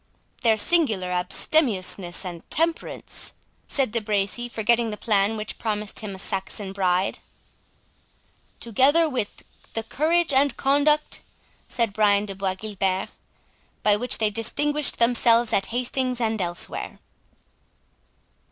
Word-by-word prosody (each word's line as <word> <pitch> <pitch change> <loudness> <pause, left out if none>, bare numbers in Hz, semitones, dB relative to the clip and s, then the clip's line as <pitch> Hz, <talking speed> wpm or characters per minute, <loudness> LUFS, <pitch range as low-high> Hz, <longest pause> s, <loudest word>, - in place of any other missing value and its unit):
"Their 225 -3 +3
singular 215 - +2
abstemiousness 185 - +1
and 175 -2 -8
temperance," 330 +2 -2 0.3
said 270 -6 0
De 230 0 -1
Bracy, 210 +3 -1
forgetting 235 +1 +1
the 210 - -5
plan 210 0 +1
which 215 0 -6
promised 210 -2 -2
him 205 -3 -6
a - - -10
Saxon 195 0 -3
bride. 185 -1 0 1.4
"Together 275 +9 +3
with 250 -8 -4 0.3
the 225 - -2
courage 315 +6 +1
and 275 +1 +2
conduct," 290 +2 +2 0.5
said 230 -4 0
Brian 205 -1 +3
de 200 - -4
Bois 190 -1 -2
Guilbert, 195 -2 -2 0.7
"by 210 -1 +4
which 245 +4 0
they 215 -1 +1
distinguished 290 +7 +1
themselves 235 -1 +4
at 195 - +1
Hastings 250 +1 -1
and 220 -3 -1
elsewhere." 175 0 -3
220 Hz, 120 wpm, -24 LUFS, 195-255 Hz, 1.4 s, by